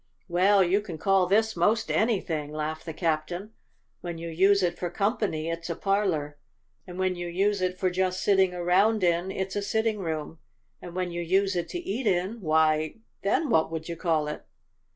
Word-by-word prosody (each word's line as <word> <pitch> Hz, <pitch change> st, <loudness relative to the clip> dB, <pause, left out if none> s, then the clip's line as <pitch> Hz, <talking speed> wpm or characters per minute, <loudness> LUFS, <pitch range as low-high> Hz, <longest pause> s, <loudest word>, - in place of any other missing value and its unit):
"Well, 190 Hz, +3 st, +4 dB
you 190 Hz, +4 st, +2 dB
can 180 Hz, -6 st, -7 dB
call 190 Hz, +2 st, +3 dB
this 220 Hz, +3 st, +2 dB
most 215 Hz, +6 st, +1 dB
anything," 170 Hz, -10 st, 0 dB
laughed 155 Hz, +2 st, -4 dB
the -, -, -2 dB
captain. 170 Hz, +5 st, -2 dB, 0.5 s
"When 170 Hz, -2 st, -6 dB
you 165 Hz, +1 st, -6 dB
use 195 Hz, +4 st, +3 dB
it 175 Hz, -1 st, -1 dB
for 175 Hz, -, -2 dB
company, 200 Hz, -5 st, -1 dB
it's 165 Hz, 0 st, -4 dB
a 170 Hz, -, -2 dB
parlor; 170 Hz, -8 st, -1 dB, 0.5 s
and 180 Hz, 0 st, -8 dB
when 185 Hz, -1 st, 0 dB
you 175 Hz, 0 st, -5 dB
use 195 Hz, +3 st, 0 dB
it 185 Hz, 0 st, -1 dB
for 185 Hz, -1 st, 0 dB
just 185 Hz, +1 st, -1 dB
sitting 190 Hz, -2 st, +4 dB
around 185 Hz, +4 st, +2 dB
in, 175 Hz, +1 st, +2 dB
it's 190 Hz, 0 st, -3 dB
a 205 Hz, -, 0 dB
sitting 220 Hz, +1 st, 0 dB
room; 160 Hz, -3 st, -4 dB, 0.4 s
and 175 Hz, 0 st, -9 dB
when 180 Hz, -1 st, -2 dB
you 175 Hz, 0 st, -3 dB
use 190 Hz, +3 st, +1 dB
it 175 Hz, -, -2 dB
to -, -, -4 dB
eat 245 Hz, -, -3 dB
in, 195 Hz, +4 st, 0 dB
why, 155 Hz, -1 st, +2 dB, 0.3 s
then 255 Hz, +8 st, +1 dB
what 160 Hz, -5 st, +3 dB
would 160 Hz, -1 st, -5 dB
you 170 Hz, -, -4 dB
call 160 Hz, -3 st, 0 dB
it?" 150 Hz, -, -5 dB
180 Hz, 195 wpm, -27 LUFS, 165-200 Hz, 0.5 s, Well